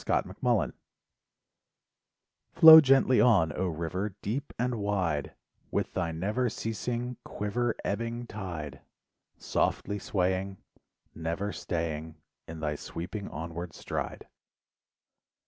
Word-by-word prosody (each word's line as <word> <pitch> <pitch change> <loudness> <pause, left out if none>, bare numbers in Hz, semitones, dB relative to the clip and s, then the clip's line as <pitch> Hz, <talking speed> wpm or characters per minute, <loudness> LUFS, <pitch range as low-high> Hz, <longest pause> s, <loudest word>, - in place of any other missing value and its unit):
THE - - -1
RIVER - - +2 1.8
Flow 160 -2 +11
gently 135 -4 +4
on, 105 -9 +5
0 90 +5 -2
river, 90 +5 -3
deep 130 +8 -3
and 125 -1 -1
wide, 95 -8 -1 0.3
With - - -2
thy 85 -3 -1
never 105 +10 -1
ceasing 120 +3 -3
quiver, 115 +3 -2
ebbing 115 +3 -2
tide. 85 - -6 0.6
Softly 100 0 -1
swaying, 95 0 -1 0.6
Never 85 +5 -3
staying 80 -2 -3 0.3
In 80 -1 -8
thy 75 -1 -2
sweeping 95 +7 -6
onward 85 +1 -6
stride. - - -5
95 Hz, 100 wpm, -29 LUFS, 85-115 Hz, 1.8 s, Flow